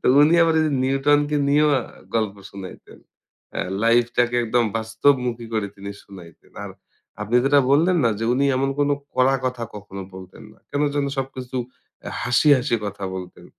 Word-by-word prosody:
তো - - -2
উনি 155 +3 +5
আবার 165 -1 +3
ওই - - +3
যে 150 - -1
নিউটনকে 145 +2 +2
নিয়েও 150 +1 +4 0.4
গল্প 110 -3 0 0.2
শুনাইতেন। 95 -2 -11 0.5
অ্যা - - -2 0.2
লাইফটাকে 120 +1 +2
একদম 120 +1 +1
বাস্তবমুখী 115 +1 0
করে 110 -2 0
তিনি 100 0 -7
শুনাইতেন। 90 -4 -15
আর - - -7 0.5
আপনি 115 +4 0
যেটা 140 +1 +5
বললেন 170 +6 +4
না 115 - +4
যে 115 - -2
উনি 135 +2 +1
এমন 135 +1 0
কোনো 145 0 +2 0.2
কড়া 130 +1 +3
কথা 125 -2 -2
কখনো 100 -1 -8
বলতেন 95 +3 -12
না। - - -23
কেন 145 +1 -1
যেন 140 -1 0
সবকিছু 130 -1 -5 0.5
অ্যা - - -7
হাসি, 120 +5 +2
হাসি 125 -1 0
কথা 100 -1 -6
বলতেন। 90 -1 -9
125 Hz, 170 wpm, -22 LUFS, 110-140 Hz, 0.5 s, উনি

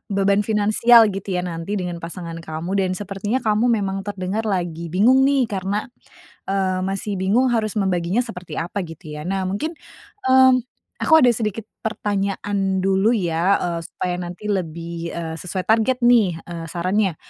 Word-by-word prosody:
beban 200 +1 +3
finansial 220 +3 +5
gitu 195 +1 -6
ya 180 - 0
nanti 165 +4 -6
dengan 175 -1 -4
pasangan 170 -1 -7
kamu. 160 +4 -4
Dan 185 -1 +1
sepertinya 205 +5 -2
kamu 215 +3 +2 0.2
memang 195 0 -2
terdengar 200 +2 -3
lagi 170 -2 -4
bingung 250 +7 +5
nih 275 -2 +3
karena, 195 +2 -1 0.7
eee, 190 -1 0
masih 195 +1 -3
bingung 230 +7 +3
harus 215 -2 -1
membaginya 185 +4 +1
seperti 180 -4 -8
apa 195 - -7
gitu 165 +1 -12
ya? 155 - -6
Nah, 195 -1 -1
mungkin, 300 - -2 0.6
mmm, 260 0 +7 0.4
aku 320 - +4
ada 245 - +6
sedikit 220 -1 -2 0.2
pertanyaan 200 -2 -1
dulu 195 +5 +3
ya, 175 0 +2
eee, 170 -1 -2
supaya 180 -1 -3
nanti 180 +4 -5
lebih, 170 -2 -4
eee, 165 -1 -4
sesuai 185 +2 -4
target 230 +3 +2
nih, 240 -5 +5
eee, 170 -1 -7
sarannya. 185 +2 0
195 Hz, 155 wpm, -21 LUFS, 175-215 Hz, 0.7 s, mmm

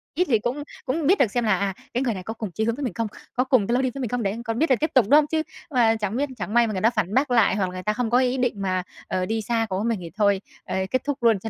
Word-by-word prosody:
ít 360 +4 +2
thì 225 -4 +4
cũng 250 +6 -3 0.2
cũng 290 +3 -1
biết 380 +4 +4
được 235 -7 +3
xem 240 +1 0
là 210 -4 +2
à 200 -1 -1 0.2
cái 250 - 0
người 240 -4 0
này 185 -2 -6
có 220 - -5
cùng 220 -4 -6
chí 215 - -2
hướng 230 0 0
với 285 - -5
mình 245 -8 -2
không, 230 +2 -2 0.3
có 250 - +2
cùng 255 -6 +2
cái 235 - 0
lối 260 - +2
đi 260 - 0
với 275 - -5
mình 245 - -2
không, 245 -1 -1
để 200 +3 -1
còn 225 0 -2
biết 320 - +2
là 260 - +5
tiếp 315 +5 -1
tục, 255 -5 +6
đúng 295 - +8
không? 300 - 0
Chứ 315 +1 0 0.3
mà 235 -4 +4
chẳng 210 -1 -3
biết 285 +1 0
chẳng 210 - -4
may 235 0 +5
mà 215 - -3
người 185 - -2
ta 225 - +5
phản 210 -5 -2
bác 265 +2 +2
lại, 230 -5 +4
hoặc 195 -2 +1
là 180 - -9
người 185 - -6
ta 210 - +1
không 235 +1 -1
có 245 +2 +4
ý 255 0 +1
định 245 -5 -1
mà, 185 -1 0 0.2
ờ, 185 -1 -1
đi 220 +3 -1
xa 225 +1 0
cùng 190 0 -1
với 215 - -2
mình 225 -5 -1
thì 170 -1 -8
thôi, 200 -3 +2 0.2
ờ, - - -4 0.2
kết 255 -1 0
thúc 285 -3 -3
luôn 225 -4 +4
cho 225 +4 -5
230 Hz, 360 wpm, -24 LUFS, 210-255 Hz, 0.3 s, đúng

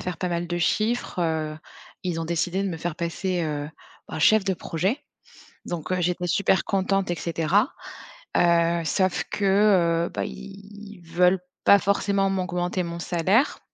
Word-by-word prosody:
faire 180 -3 -4
pas 180 - -1
mal 175 0 -2
de 175 0 -3
chiffres, 215 +5 0
heu, 160 -2 -1 0.5
ils 175 -2 -2
ont - - -2
décidé 175 +3 -1
de 200 - -1
me 170 - -4
faire 165 0 -4
passer, 175 +2 -2
heu, 150 -2 -3 0.4
bah - - -5
chef 215 +5 +5
de 195 -1 0
projet, 185 - -2 0.7
donc, 175 -1 -5
heu, 185 - +1
j'étais 180 0 -1
super 185 0 +2
contente 195 -1 0
et - - 0
cetera. 170 - +1 0.7
Heu, 170 0 +3
sauf 185 +5 +1
que, 190 -4 +3
heu, - - -7
bah, - - -3
ils 200 0 -10
veulent 180 +3 +2 0.3
pas 200 - +8
forcément 200 0 +1
m'augmenter 180 -1 -1
mon 170 0 -5
salaire, 185 - +1
180 Hz, 160 wpm, -25 LUFS, 170-195 Hz, 0.7 s, pas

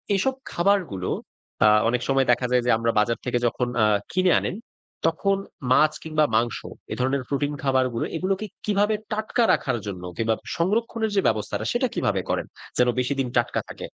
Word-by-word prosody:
এসব 265 +8 +1 0.2
খাবারগুলো 175 - +1 0.6
আ - - +8 0.2
অনেক 125 0 0
সময় 135 -1 +3
দেখা 125 +1 +2
যায় 125 -1 +3
যে, - - +1
আমরা 115 0 +1
বাজার 115 +2 +1
থেকে 125 -1 +1
যখন 125 +1 -1 0.2
আ - - +6 0.3
কিনে 185 -1 +3
আনেন, - - -3 0.5
তখন 195 +4 +1 0.3
মাছ 155 +3 +5
কিংবা 155 -1 +1
মাংস 115 0 +1 0.3
এ - - -3
ধরনের 130 +1 0
প্রোটিন 145 +1 -1
খাবারগুলো 130 -3 +1
এগুলোকে 190 +4 -1 0.2
কিভাবে 210 +1 +2 0.2
টাটকা 215 +2 0
রাখার 120 - 0
জন্য 90 -3 -5
কিংবা 115 0 +1 0.2
সংরক্ষণের 220 +5 0
যে, 195 - +4
ব্যবস্থাটা, 105 -2 -1
সেটা - - +1
কিভাবে - - 0
করেন, - - 0 0.3
যেন 125 0 +4
বেশিদিন 135 0 0
টাটকা 120 0 +1
থাকে? - - -7
135 Hz, 165 wpm, -24 LUFS, 120-195 Hz, 0.6 s, আ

